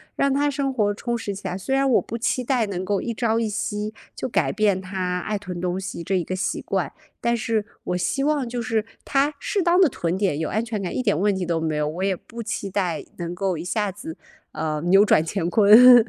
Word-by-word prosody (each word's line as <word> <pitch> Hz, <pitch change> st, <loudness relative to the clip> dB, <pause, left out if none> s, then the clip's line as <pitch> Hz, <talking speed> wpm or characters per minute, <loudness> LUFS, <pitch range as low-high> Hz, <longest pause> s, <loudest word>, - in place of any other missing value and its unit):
让 275 Hz, -1 st, +2 dB
她 290 Hz, +1 st, +2 dB
生 275 Hz, -1 st, -1 dB
活 205 Hz, -4 st, +1 dB
充 235 Hz, +3 st, -3 dB
实 205 Hz, -3 st, -4 dB
起 195 Hz, 0 st, -6 dB
来， 180 Hz, -, -3 dB
虽 265 Hz, +8 st, -1 dB
然 275 Hz, 0 st, +3 dB
我 245 Hz, -, +4 dB
不 230 Hz, -, -5 dB
期 250 Hz, +2 st, 0 dB
待 245 Hz, -3 st, +1 dB
能 185 Hz, -2 st, -3 dB
够 200 Hz, +1 st, 0 dB
一 235 Hz, -, -3 dB
朝 225 Hz, 0 st, +1 dB
一 225 Hz, -, 0 dB
夕 210 Hz, +1 st, -3 dB, 0.2 s
就 -, -, -3 dB
改 -, -, +1 dB
变 205 Hz, -3 st, +2 dB
她 185 Hz, -1 st, -2 dB
爱 210 Hz, +3 st, -2 dB
囤 180 Hz, -3 st, -6 dB
东 180 Hz, +1 st, -1 dB
西 190 Hz, -3 st, -5 dB
这 190 Hz, +3 st, 0 dB
一 175 Hz, -, 0 dB
个 185 Hz, -, -3 dB
习 185 Hz, -, -1 dB
惯， -, -, -1 dB, 0.3 s
但 235 Hz, 0 st, +2 dB
是 220 Hz, -1 st, 0 dB, 0.2 s
我 180 Hz, -, -1 dB
希 275 Hz, +10 st, 0 dB
望 290 Hz, -4 st, +1 dB
就 240 Hz, 0 st, -3 dB
是 225 Hz, -3 st, 0 dB, 0.2 s
她 285 Hz, +2 st, +2 dB
适 400 Hz, -, -1 dB
当 350 Hz, +2 st, +4 dB
地 370 Hz, -, +7 dB
囤 175 Hz, -4 st, -2 dB
点 185 Hz, -7 st, 0 dB
有 160 Hz, -, -1 dB
安 220 Hz, +4 st, 0 dB
全 220 Hz, -3 st, -3 dB
感， 180 Hz, -, -4 dB
一 -, -, 0 dB
点 150 Hz, -, +2 dB
问 205 Hz, 0 st, +2 dB
题 185 Hz, -1 st, -2 dB
都 165 Hz, -1 st, 0 dB
没 155 Hz, -2 st, -1 dB
有。 150 Hz, 0 st, +1 dB
我 170 Hz, +5 st, -3 dB
也 195 Hz, -1 st, +2 dB
不 230 Hz, +6 st, -9 dB
期 210 Hz, -3 st, -3 dB
待 180 Hz, -5 st, -1 dB
能 175 Hz, 0 st, -4 dB
够 190 Hz, -1 st, 0 dB
一 165 Hz, -, -5 dB
下 205 Hz, +2 st, -1 dB
子， 180 Hz, -4 st, -8 dB, 0.4 s
呃， 155 Hz, -1 st, -2 dB
扭 195 Hz, +3 st, +6 dB
转 160 Hz, -, +4 dB
乾 170 Hz, -1 st, -1 dB
坤。 225 Hz, +4 st, +8 dB
205 Hz, 270 characters per minute, -23 LUFS, 180-235 Hz, 0.4 s, 坤